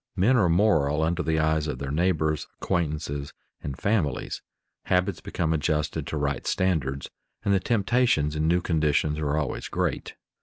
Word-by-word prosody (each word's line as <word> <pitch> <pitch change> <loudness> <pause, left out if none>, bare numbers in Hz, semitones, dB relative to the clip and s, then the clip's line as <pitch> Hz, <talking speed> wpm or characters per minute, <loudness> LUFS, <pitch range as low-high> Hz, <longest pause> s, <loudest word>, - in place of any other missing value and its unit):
Men 105 +7 +4
are 100 -8 +4
moral 80 -5 +3
under 85 +2 0
the 80 -2 0
eyes 80 0 +1
of 75 - -3
their 70 -1 -4
neighbors, 80 -2 +1
acquaintances, 75 -3 -2 0.3
and 70 -2 -5
families; 95 - -1 0.4
habits 90 0 +1
become 80 -2 -1
adjusted 75 -1 -1
to 80 - -3
right 70 -2 -2
standards, 70 -8 0 0.3
and 100 - +3
the 95 - +4
temptations 105 -7 +2
in 75 +1 +1
new 90 +2 +3
conditions 75 -2 +1
are 75 0 0
always 75 -3 -2
great. - - -2
80 Hz, 155 wpm, -26 LUFS, 75-90 Hz, 0.4 s, Men